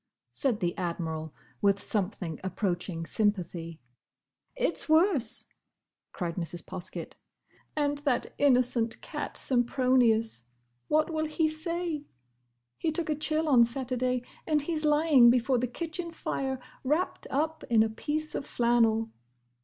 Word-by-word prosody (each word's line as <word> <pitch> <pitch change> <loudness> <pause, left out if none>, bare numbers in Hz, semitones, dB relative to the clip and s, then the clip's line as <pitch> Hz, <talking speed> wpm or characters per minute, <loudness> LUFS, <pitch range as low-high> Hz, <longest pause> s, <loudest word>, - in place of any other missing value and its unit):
said 240 -6 -1
the 175 -1 0
Admiral, 160 -3 -3 0.3
with 200 -1 +3
something 185 -6 -2
approaching 180 -3 -2
sympathy. 175 -6 -1 0.8
"It's - - -1
worse!" 315 - +3 0.7
cried 170 -2 -4
Mrs. 170 -1 -3
Poskett. 180 - -6 0.6
"And 290 -1 0
that 280 -4 0
innocent 250 -4 +3
cat, - - -5
Sempronius!—What 230 - +1
will 315 -1 0
he 315 +1 +1
say? 315 -1 -3 0.7
He 320 - 0
took 315 0 -2
a - - +1
chill 310 +1 0
on 255 -5 +7
Saturday 250 0 -1 0.2
and 305 -2 +2
he's 310 -1 -2
lying 295 -5 +6
before 250 +1 +3
the 250 - 0
kitchen 335 +6 -4
fire 265 -4 -2 0.3
wrapped 305 +8 0
up 315 +3 -1
in 225 -2 +5
a - - +1
piece 305 +7 -2
of - - -4
flannel. 230 -2 +2
250 Hz, 120 wpm, -29 LUFS, 200-305 Hz, 0.8 s, on